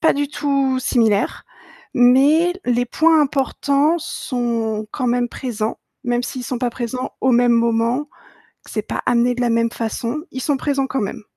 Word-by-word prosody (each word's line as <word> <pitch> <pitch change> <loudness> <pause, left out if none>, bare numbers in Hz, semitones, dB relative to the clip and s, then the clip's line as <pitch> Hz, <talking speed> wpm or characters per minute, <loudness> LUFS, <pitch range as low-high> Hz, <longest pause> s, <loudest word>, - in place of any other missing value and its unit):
pas 320 - +4
du 285 0 -1
tout 275 -3 0
similaires 220 -5 +1 0.5
mais 280 +8 +5
les 245 0 +2
points 320 +6 +3
importants 280 +2 +1
sont 230 -6 -2
quand 255 -3 -2
même 245 0 +1
présents, 225 -4 -4 0.3
même 245 0 0
s'ils 250 0 -5
sont 250 0 -3
pas 245 0 0
présents 250 +2 -4
au 260 -1 +3
même 245 0 +4
moment, 235 +4 +1 0.6
que - - -15
c'est - - -2
pas - - -3
amené 245 0 +2
de 245 - -3
la 240 - +1
même 230 0 +1
façon, 235 +5 -3
ils 260 - -6
sont 285 -1 0
présents 275 -1 0
quand 265 0 -2
même. 200 +1 -4
245 Hz, 175 wpm, -20 LUFS, 235-275 Hz, 0.6 s, mais